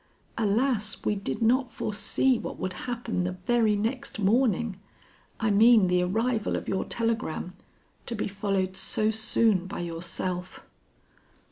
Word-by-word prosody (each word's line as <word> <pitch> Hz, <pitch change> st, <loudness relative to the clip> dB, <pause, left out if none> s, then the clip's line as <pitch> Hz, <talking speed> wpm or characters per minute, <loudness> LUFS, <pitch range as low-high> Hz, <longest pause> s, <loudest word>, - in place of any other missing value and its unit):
Alas! 220 Hz, 0 st, +1 dB
we -, -, +2 dB
did 205 Hz, +3 st, -3 dB
not 250 Hz, +3 st, +2 dB
foresee 225 Hz, +4 st, +1 dB
what -, -, -6 dB
would 185 Hz, 0 st, -3 dB, 0.2 s
happen 235 Hz, -6 st, -2 dB
the 180 Hz, 0 st, -2 dB
very 215 Hz, +4 st, +1 dB
next 225 Hz, +6 st, -3 dB
morning 215 Hz, -1 st, +1 dB, 0.6 s
I 220 Hz, -2 st, +1 dB
mean 220 Hz, 0 st, +6 dB
the 180 Hz, 0 st, +3 dB
arrival 220 Hz, +5 st, 0 dB
of -, -, -4 dB
your 190 Hz, -, -1 dB
telegram, 225 Hz, -6 st, -2 dB, 0.5 s
to 235 Hz, -, -3 dB
be 210 Hz, -, -2 dB
followed 195 Hz, -2 st, -1 dB
so 215 Hz, +3 st, +1 dB
soon 220 Hz, -3 st, +2 dB
by 190 Hz, -, -5 dB
yourself." 175 Hz, +2 st, -4 dB
210 Hz, 135 wpm, -27 LUFS, 185-230 Hz, 0.6 s, mean